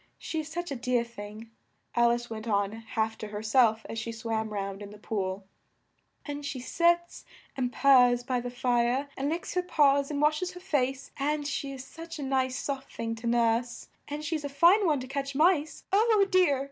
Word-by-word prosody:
She 320 - -4
is 310 - -4
such 345 +1 -5
a - - -2
dear 245 -1 +1
thing," 220 -1 -10 0.4
Al 235 0 +4
ice 240 0 -1
went 220 0 -7
on 200 -2 +1
half 225 0 -3
to 215 - -5
her 210 0 -6
self 220 -1 +3
as 225 - -4
she 230 +1 -4
swam 225 -1 -3
round 195 -1 -4
in 205 - -7
the 210 - -12
pool, 195 -2 -3 0.8
"and 290 -1 -5
she 280 -2 -4
sits 345 +6 +1 0.3
and 250 -2 -1
purrs 245 -3 +5
by 250 0 -1
the 245 0 -4
fire 245 +2 +1
and 275 +2 -1
licks 335 +2 -3
her 360 - +1
paws 285 -5 +3
and 290 -2 -2
wash 300 +2 +2
es 365 0 -3
her 360 - -9
face 275 -7 -1
and 295 +1 -1
she 280 -1 -3
is 265 -1 -8
such 330 +2 -9
a 290 - -5
nice 260 -1 0
soft 275 -1 -4
thing 225 0 -3
to 230 +1 -5
nurse 235 0 +1 0.2
and 300 +1 -5
she's 310 -1 -2
a 285 - -3
fine 350 +8 +5
one 300 -4 +2
to 255 - -7
catch 275 +1 -4
mice 310 -1 +2
Oh, 425 -1 +5
dear!" 360 -8 +4
260 Hz, 210 wpm, -28 LUFS, 230-300 Hz, 0.8 s, purrs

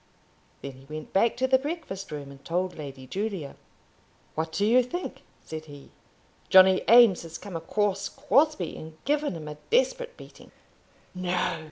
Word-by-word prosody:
Then 140 - -5
he 130 +1 -16
went 155 +2 -8
back 230 +5 +3
to 260 - +1
the 260 0 +4
breakfast 285 - -5
room 145 -2 -6
and 140 0 -15
told 180 +2 -2
Lady 135 -3 -8
Julia. 190 -1 -4 0.8
"What 160 +1 -3
do 200 +5 0
you 240 +4 +5
think?" 350 +9 -5 0.2
said 155 0 -7
he; 145 -2 -13 0.6
"Johnny 190 0 +7
Eames 230 -5 +7
has 165 -1 -8
come 200 -4 -9
across 195 +4 -1
Crosbie, 280 - +1
and 160 0 -10
given 290 - 0
him 155 -2 -7
a 150 0 -7
desperate - - +1
beating." - - -14 0.6
"No!" 180 -2 -1
185 Hz, 160 wpm, -27 LUFS, 155-245 Hz, 0.8 s, Johnny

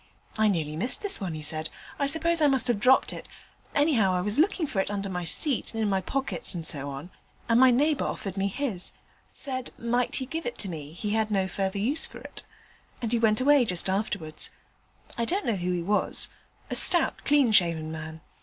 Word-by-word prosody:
"I 220 0 +2
nearly 160 -6 -1
missed 245 - +2
this 400 - +1
one," 180 -5 -3
he 155 - -7
said. 155 0 -2 0.3
"I 280 - +1
suppose 330 +3 +5
I 300 - +5
must 265 -3 +2
have 230 -4 +1
dropped 255 +4 +4
it: - - -9 0.5
anyhow, 245 - +3
I 180 - 0
was 210 +7 +2
looking 345 0 +2
for 225 -9 -3
it 190 - 0
under 200 -1 -3
my 180 -2 -4
seat 255 - -1
and 225 - -1
in 205 - 0
my 190 -1 +1
pockets 220 -8 -1
and 165 -2 -3
so 140 -2 -1
on, 140 +6 -8 0.4
and 230 0 +3
my 260 0 +7
neighbour 285 +4 +2
offered 195 -2 -4
me 195 0 0
his; 200 -4 -3 0.4
said 260 -2 -4
'might 240 +1 -1
he 260 - -1
give 320 +2 -5
it 240 -3 -2
me, 155 -5 -7
he 205 +5 -4
had 220 0 0
no 195 -3 0
further 190 +1 -2
use 250 +10 +1
for - - -12
it,' - - -6 0.6
and 230 -2 -3
he 235 - +2
went 215 -2 +3
away 285 0 +5
just 185 -3 -2
afterwards. 165 -6 -2 0.7
I 235 - +1
don't 385 - -1
know 235 -4 +1
who 180 0 -2
he 175 -1 -2
was 205 +4 0 0.4
a - - -1
stout, 345 -2 +5
clean 285 -5 +3
shaven 165 -6 +2
man. 160 0 -7
215 Hz, 215 wpm, -27 LUFS, 180-260 Hz, 0.7 s, my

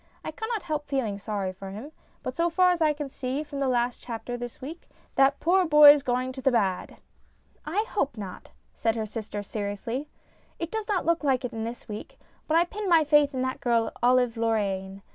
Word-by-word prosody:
I - - -3
cannot 445 -2 -4
help 305 -3 -3
feeling 235 -8 -1
sorry 200 -3 -3
for 195 +1 -9
him, 220 +10 -8 0.3
but 255 - -4
so 340 +1 +2
far 365 +2 +4
as 350 -2 -1
I 310 -1 +4
can 295 -1 -4
see 265 +2 -3
from 285 -2 -7
the 275 - +1
last 245 -1 0
chapter 240 +1 -5
this 245 -1 -7
week, 310 +6 -9 0.2
that 275 +1 +4
poor 370 +3 +3
boy's 300 -3 +8
going 255 -1 -1
to 265 0 -8
the 270 - +3
bad." 195 -6 0 0.4
" - - -37 0.3
I 400 +8 0
hope 280 - -1
not," 195 -3 -8 0.2
said 225 0 0
her 220 -1 -2
sister, 210 -1 -5
seriously. 215 +7 -4 0.2
" - - -35
It 335 0 -4
does 440 -1 -4
look 335 -5 +1
like 265 -3 +1
it 250 - -4
this 230 +1 -6
week, 210 -1 -8 0.3
but 315 - +3
I 340 - +6
pin 410 +2 -4
my 330 -2 +6
faith 295 -1 +4
in 255 - 0
that 260 0 -3
girl, 230 -3 +1
Olive 245 -1 +3
Lorraine. 200 -4 -1
260 Hz, 210 wpm, -27 LUFS, 225-305 Hz, 0.4 s, boy's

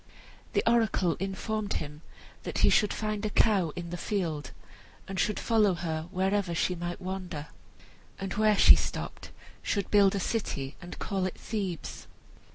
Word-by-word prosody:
The - - +2
oracle 225 -7 +3
informed 205 +2 -2
him 150 0 -5 0.4
that - - -5
he - - +5
should 210 - +4
find 215 -1 -2
a 215 - 0
cow 200 -6 +3
in 170 -1 -5
the 175 - -3
field, 165 -8 -2 0.6
and 195 -1 -4
should 210 +3 +1
follow 215 -5 +3
her 160 -2 -3
wherever 190 -1 0
she 180 - +1
might 175 0 -4
wander, 185 -5 -5 0.7
and 195 -1 -4
where 215 -1 +3
she - - +9
stopped, - - -4 0.3
should 200 -3 -1
build 200 -1 +5
a - - 0
city 145 -10 -2
and 175 -1 -8
call 190 -2 -1
it 185 - -7
Thebes. 195 -7 -4
190 Hz, 160 wpm, -29 LUFS, 175-210 Hz, 0.7 s, she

